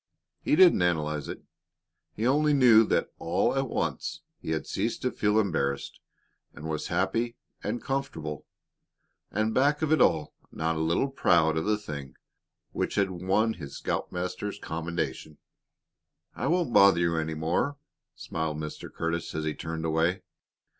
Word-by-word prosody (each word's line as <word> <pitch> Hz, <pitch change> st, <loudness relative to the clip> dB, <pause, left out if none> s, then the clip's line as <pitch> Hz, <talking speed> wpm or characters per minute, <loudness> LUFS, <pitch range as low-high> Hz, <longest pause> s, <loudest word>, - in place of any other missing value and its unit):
He -, -, +2 dB
didn't 175 Hz, -, +6 dB
analyze 75 Hz, -4 st, 0 dB
it. -, -, -7 dB, 0.7 s
He 110 Hz, -, -2 dB
only 150 Hz, +4 st, +3 dB
knew 120 Hz, -5 st, +7 dB
that -, -, 0 dB
all 85 Hz, +9 st, +1 dB
at 135 Hz, -2 st, 0 dB
once -, -, -2 dB, 0.2 s
he -, -, -7 dB
had 80 Hz, -1 st, -1 dB
ceased 110 Hz, +4 st, -2 dB
to 125 Hz, -, +1 dB
feel 105 Hz, +1 st, +2 dB
embarrassed 70 Hz, -9 st, -1 dB, 0.6 s
and 75 Hz, -, -7 dB
was 80 Hz, -1 st, -3 dB
happy 95 Hz, +7 st, 0 dB, 0.3 s
and 110 Hz, +4 st, -3 dB
comfortable, 80 Hz, -, -4 dB, 0.8 s
and 110 Hz, +2 st, 0 dB
back 145 Hz, +4 st, +2 dB
of 155 Hz, -, +1 dB
it 155 Hz, -, +4 dB
all 75 Hz, -2 st, +3 dB, 0.2 s
not 80 Hz, +1 st, -1 dB
a -, -, -2 dB
little 85 Hz, +12 st, +1 dB
proud 80 Hz, -, +3 dB
of 80 Hz, -, -1 dB
the 105 Hz, 0 st, +2 dB
thing 70 Hz, -10 st, -7 dB, 0.6 s
which -, -, -2 dB
had 100 Hz, -2 st, +2 dB
won 95 Hz, +5 st, +1 dB
his 75 Hz, -7 st, -8 dB
scoutmaster's 90 Hz, +3 st, -3 dB
commendation. 80 Hz, -2 st, -4 dB, 1.0 s
"I -, -, -2 dB
won't 170 Hz, -7 st, +1 dB
bother 100 Hz, -3 st, +7 dB
you 85 Hz, -1 st, +1 dB
any 80 Hz, 0 st, -2 dB
more," 85 Hz, -, 0 dB, 0.4 s
smiled 80 Hz, -2 st, -3 dB
Mr. 75 Hz, -1 st, -6 dB
Curtis, 85 Hz, -1 st, -3 dB
as 80 Hz, 0 st, -2 dB
he 75 Hz, -, -1 dB
turned 80 Hz, 0 st, -5 dB
away. 85 Hz, +4 st, +1 dB
90 Hz, 155 wpm, -28 LUFS, 80-110 Hz, 1.0 s, knew